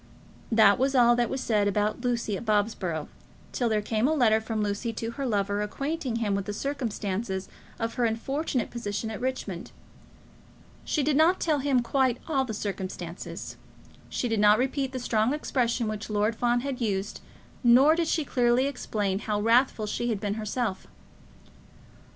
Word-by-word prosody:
That 220 -3 +6
was 270 +1 +1
all 240 -1 +6
that 240 -1 +1
was 265 - -3
said 210 -4 +1
about 210 +3 0
Lucy 235 -4 -1
at 195 - -5
Bobsborough, 205 -7 0 0.4
till 240 -2 0
there 215 -1 +1
came 220 +3 +1
a 315 - +2
letter 220 -6 +4
from 220 -1 -2
Lucy 210 +3 -2
to 225 +1 -4
her 275 +2 -3
lover 205 -2 0
acquainting 275 +4 -3
him 220 -3 0
with 200 -1 -1
the 205 - -4
circumstances 210 -7 -3 0.3
of 230 -1 -2
her 245 -2 +1
unfortunate 255 +3 -1
position 220 -1 -3
at 220 - -6
Richmond. 245 -9 -4 1.1
She 300 - 0
did 295 +1 +2
not 325 +5 +4
tell 310 -3 +1
him 265 -3 +2
quite 260 -1 +1
all 275 -5 +1
the 225 - -5
circumstances. 185 -4 -6 0.5
She 245 - -2
did 225 -2 0
not 210 0 +6
repeat 265 +2 -1
the 260 - -4
strong 235 +1 +1
expressions 245 -5 0
which 215 0 -4
Lord 210 +1 +1
Fawn 240 +1 +1
had 270 -1 -4
used, 200 -3 -2 0.4
nor 255 +6 +7
did 335 0 0
she 315 -2 0
clearly 245 0 +2
explain 210 -8 -2
how 210 -1 -2
wrathful 230 +1 +3
she 240 +3 -2
had 220 -4 -1
been 205 0 -2
herself. 215 -1 -3
230 Hz, 170 wpm, -27 LUFS, 210-260 Hz, 1.1 s, nor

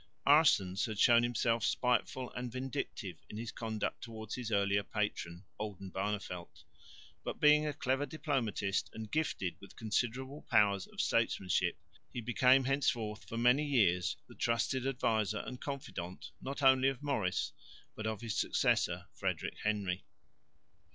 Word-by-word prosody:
Aerssens 130 - +5
had 110 -2 -5
shown 120 +2 +6
himself 120 -1 +1
spiteful 125 +2 +1
and 125 -1 -5
vindictive 130 +1 -4
in 105 - -7
his 115 0 -4
conduct 110 -2 -3
towards 110 -2 -7
his 120 -3 -4
earlier 100 0 +3
patron, 100 -4 -3
Oldenbarneveldt, 95 -2 -4 0.6
but - - -4
being 150 0 +6
a 150 - -1
clever 135 0 0
diplomatist 125 - -1
and 110 -1 -7
gifted 150 - -1
with 100 - -13
considerable 125 +6 -2
powers 100 -5 +4
of - - -3
statesmanship, 95 -2 +1 0.3
he - - -4
became 130 +3 +4
henceforth 125 -5 0
for 115 - -4
many 125 +5 +4
years 95 -11 +2
the - - -13
trusted 120 +3 0
adviser 110 -5 0
and 125 - -7
confidant 95 -11 -6
not 140 +1 -5
only 130 0 +6
of 135 +1 -6
Maurice, 105 -11 0 0.4
but 110 - -4
of 110 -2 -3
his 115 -3 -3
successor - - +1
Frederick - - -3
Henry. 100 -4 -1
115 Hz, 140 wpm, -34 LUFS, 105-130 Hz, 0.6 s, shown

